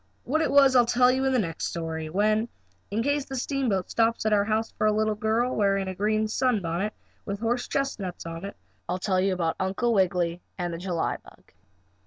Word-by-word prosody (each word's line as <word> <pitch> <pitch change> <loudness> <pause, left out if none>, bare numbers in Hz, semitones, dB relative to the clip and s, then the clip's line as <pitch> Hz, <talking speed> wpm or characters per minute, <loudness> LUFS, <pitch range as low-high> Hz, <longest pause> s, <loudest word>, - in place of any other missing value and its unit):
What 310 +5 0
it - - +1
was 275 -2 +6
I'll 245 - +7
tell 250 +1 +4
you 265 +1 0
in 265 - +2
the 260 - +2
next 170 -8 -2
story 160 -1 -4
when, 215 +6 +1 0.4
in 220 +3 -1
case 285 +1 0
the 270 - -6
steamboat 245 -8 -1
stops 230 -1 +1
at 215 - +3
our 200 -1 +4
house 220 +1 0
for 215 - 0
a - - +4
little 215 0 +1
girl 220 +4 0
wearing 195 -2 +1
a 190 - -3
green 215 +3 0
sunbonnet, 210 -5 0 0.3
with 200 -1 -4
horse 235 +2 -1
chestnuts 210 -12 -3
on 165 +1 -6
it, 200 - -6 0.3
I'll 180 - 0
tell 185 0 +1
you 195 +1 +2
about 170 -2 -1
Uncle 195 +6 0
Wiggily 180 -3 +1 0.2
and 175 -2 -3
the 165 - -5
July 175 -2 -1
bug. - - -19
215 Hz, 210 wpm, -26 LUFS, 185-240 Hz, 0.4 s, I'll